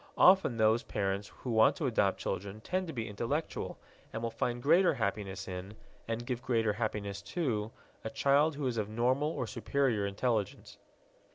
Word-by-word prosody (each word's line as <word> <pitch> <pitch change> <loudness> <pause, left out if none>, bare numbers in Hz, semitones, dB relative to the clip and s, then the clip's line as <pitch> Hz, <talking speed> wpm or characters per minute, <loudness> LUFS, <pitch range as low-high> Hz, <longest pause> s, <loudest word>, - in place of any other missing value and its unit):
Often 185 -10 +6
those 110 +1 +4
parents 100 0 -2
who 125 - -7
want 110 -1 +5
to 170 -6 -3
adopt 105 -6 +2
children 100 +2 -4
tend 185 +6 -2
to - - -4
be 115 -4 -3
intellectual, 120 +10 -3 0.3
and 115 - -5
will 115 - -1
find 120 +1 -1
greater 170 +2 +5
happiness 100 -3 -3
in 95 +2 -6 0.3
and 115 +1 -3
give 125 -1 -3
greater 115 -4 +1
happiness 100 -2 -3
to 115 - -2 0.3
a 110 - -3
child 140 +6 +3
who 145 -1 -3
is 125 -3 -1
of 105 -1 -1
normal 125 +6 +1
or 125 - -3
superior 115 -2 0
intelligence. 105 0 -2
115 Hz, 170 wpm, -32 LUFS, 105-135 Hz, 0.3 s, Often